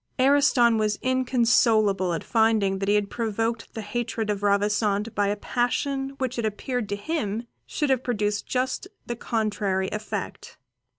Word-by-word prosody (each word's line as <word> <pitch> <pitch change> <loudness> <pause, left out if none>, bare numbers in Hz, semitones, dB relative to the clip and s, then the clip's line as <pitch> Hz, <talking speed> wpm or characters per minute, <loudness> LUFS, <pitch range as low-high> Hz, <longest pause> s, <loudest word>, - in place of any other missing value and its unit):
Ariston 260 -4 +4
was 210 -1 +1
inconsolable 230 -7 +3
at 165 - -3
finding 220 -4 +2
he 205 - +4
had 205 -1 0
provoked 225 0 -2
the 220 - -4
hatred 225 0 -2
of 200 -1 -3
Ravissante 205 +1 +1
by 205 -1 +1
a 205 - 0
passion 270 +5 -1
which 255 -2 -2
it 230 - -1
appeared 230 +1 -3
to 205 - -1
him 225 -2 -3 0.2
should 295 -3 -1
have 260 -2 +2
produced 210 -4 -1
just 255 +7 -1 0.2
the 240 - -3
contrary 205 -5 -1
effect. 215 -2 -5
220 Hz, 145 wpm, -25 LUFS, 205-245 Hz, 0.2 s, Ariston